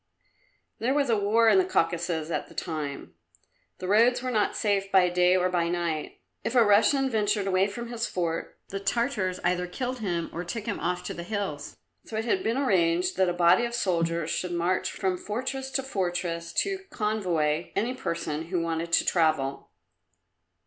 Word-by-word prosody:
There 255 +4 +1
was 280 -4 +2
a - - +4
war 215 +3 +3
in 380 - +6
the - - +4
Caucasus 170 - -1
at - - -2
the - - -16
time. 150 -4 -4 0.6
The 185 - -6
roads 235 +5 +4
were 255 - -1
not 215 -3 +1
safe 200 -2 0
by 185 -2 +5
day 180 +1 +3
or 180 0 +2
by 175 -2 0
night. 170 -3 -3 0.2
If 240 - -2
a 240 - +7
Russian 225 +7 +4
ventured 210 -4 0
away 190 0 +2
from 235 +3 -6
his 240 0 -2
fort, 170 -2 -3
the 195 - -4
Tartars 200 -3 -1
either 180 0 +1
killed 250 +7 -4
him 175 -6 -2
or 170 - -4
took 210 +5 -5
him 225 - -3
off 180 0 -2
to - - -4
the - - -6
hills. 175 -6 -4 0.3
So 220 - -5
it 220 - -2
had 375 +9 +1
been 230 -6 0
arranged 180 -8 +2
that 190 -1 +3
a - - 0
body 175 +5 +4
of 235 0 -2
soldiers 170 -6 0
should 180 -1 -2
march 175 +2 0
from 185 -2 -1
fortress 265 +5 -4
to 270 0 -1
fortress 175 -7 -2
to 390 -1 0
convoy 175 -8 -1
any 230 +5 0
person 165 - -3
who 180 0 -1
wanted 165 0 -2
to - - +4
travel. 155 -5 +1
185 Hz, 185 wpm, -27 LUFS, 170-225 Hz, 0.6 s, a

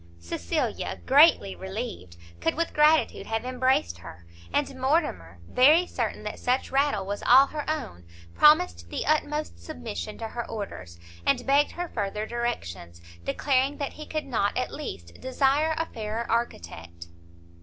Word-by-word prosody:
Cecilia, 85 0 -3
greatly 280 - +5
relieved, 190 - -6 0.2
could 165 - 0
with 335 0 -1
gratitude 305 +1 +3
have 225 +2 -2
embraced 255 - +1
her; 85 0 -12 0.3
and 275 -2 -1
Mortimer, 260 - 0
very 305 +8 +5
certain - - -3
that - - -6
such 250 +1 0
rattle 280 -5 +1
was 205 +1 -4
all 260 +3 +7
her 300 +1 -5
own, 170 - -4 0.3
promised 310 +4 +4
the - - -3
utmost 300 - 0
submission 85 0 -6
to 225 -1 -5
her 235 +1 -5
orders, 95 - -7 0.3
and - - +1
begged 285 +2 +3
her 355 0 -4
further 210 -4 -3
directions, 95 - -4 0.2
declaring 270 - +1
that 280 - -4
he 305 - -9
could 310 -1 -3
not, 220 -6 0
at 250 - -2
least, 85 - -8
desire 280 +4 +1
a 325 - 0
fairer 220 -3 -4
architect. 85 - -3
245 Hz, 145 wpm, -26 LUFS, -, 0.3 s, all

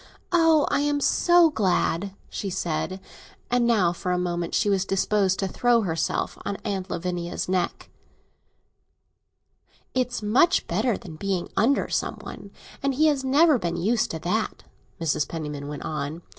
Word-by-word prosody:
"Oh, 325 -3 +4
I'm 290 0 +1
so 345 +3 +4
glad!" 195 - 0
she 200 - -4
said; 180 +1 -2 0.5
and 245 -1 +3
now, 195 -7 +3
for 180 +1 -3
a 180 - +1
moment, 175 -1 -2
she - - +2
was 195 -2 +2
disposed 195 0 +1
to 195 - -1
throw 240 +4 +2
herself 165 -5 -2
on 200 - -3
Aunt 195 -3 -3
Lavinia's 175 0 -3
neck. 180 -1 -2 2.0
"It's 250 -3 -1
much 265 - +3
better 215 +5 0
than 160 -4 -10
being 190 -1 -2
under 265 +6 +2
some - - -1
one; - - -10 0.3
and 275 -1 0
he 310 +4 +3
has 280 -3 0
never 285 +1 +4
been 170 -2 -2
used 220 +5 +1
to 160 - -4
that," 195 +7 -2 0.4
Mrs. 150 -3 0
Penniman 150 -3 -5
went 145 -1 -6
on. 155 +2 -4
195 Hz, 150 wpm, -25 LUFS, 175-245 Hz, 2.0 s, Oh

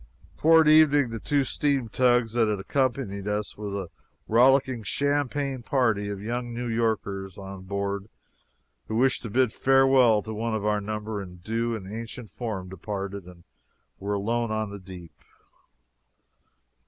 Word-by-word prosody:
Toward 160 0 +5
evening 145 -4 +5
the 115 - -4
two 145 +5 +1
steam 140 -2 0
tugs 120 -1 +2
that 115 -2 +3
had 105 -2 -1
accompanied 115 -3 -1
us 105 0 -2
with 100 -1 -5
a 95 -4 -4 0.4
rollicking 130 +1 +4
champagne 140 +2 -1
party 115 -5 +1
of 100 -1 -4
young 120 +3 -4
New 120 +1 -3
Yorkers 105 -5 -2
on 95 -1 -9
board 100 +1 -3 0.8
who - - -3
wished 130 +3 +2
to 115 - -6
bid 125 +1 +2
farewell 135 -5 +4
to 110 - -6
one 110 +1 -2
of 105 -1 -3
our 105 -1 +1
number 105 0 -4
in 90 -2 -9
due 115 +6 -2
and 95 -4 -7
ancient 115 +2 -7
form 105 -6 -5
departed, 100 +1 -5
and 90 -1 -14 0.6
we 100 - -8
were 105 - +1
alone 115 +3 -1
on 110 -1 -2
the 100 - -7
deep. 90 -3 -11
110 Hz, 155 wpm, -26 LUFS, 100-125 Hz, 0.8 s, Toward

